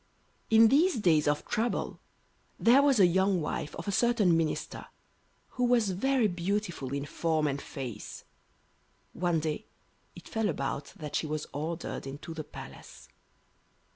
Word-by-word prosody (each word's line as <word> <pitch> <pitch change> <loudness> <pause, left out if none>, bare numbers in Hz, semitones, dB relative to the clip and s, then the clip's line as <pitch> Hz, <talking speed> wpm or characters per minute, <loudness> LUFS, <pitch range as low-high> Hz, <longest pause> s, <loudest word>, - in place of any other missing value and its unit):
In 225 0 +7
these 330 +8 +4
days 165 -9 +3
of 145 0 +1
trouble 230 +2 -2 0.6
there 250 +4 +6
was 280 -5 +4
a 190 - +8
young 190 +1 +2
wife 150 -1 -3
of 165 - -7
a - - +1
certain 215 -5 +3
minister, 165 -2 -2 0.6
who 250 - -3
was 235 -5 +3
very 250 +5 +2
beautiful 180 -6 -2
in 140 0 -2
form 160 0 0
and 140 -1 -1
face. 125 -7 -7 0.9
One 175 -2 +1
day 155 -1 -3 0.5
it - - -12
fell 220 -2 -1
about 140 -2 -3
that 155 -7 -6
she 155 - 0
was 155 0 -3
ordered 160 0 -4
into 145 +4 -7
the 160 -1 -5
Palace. 150 - -12
175 Hz, 145 wpm, -29 LUFS, 150-220 Hz, 0.9 s, a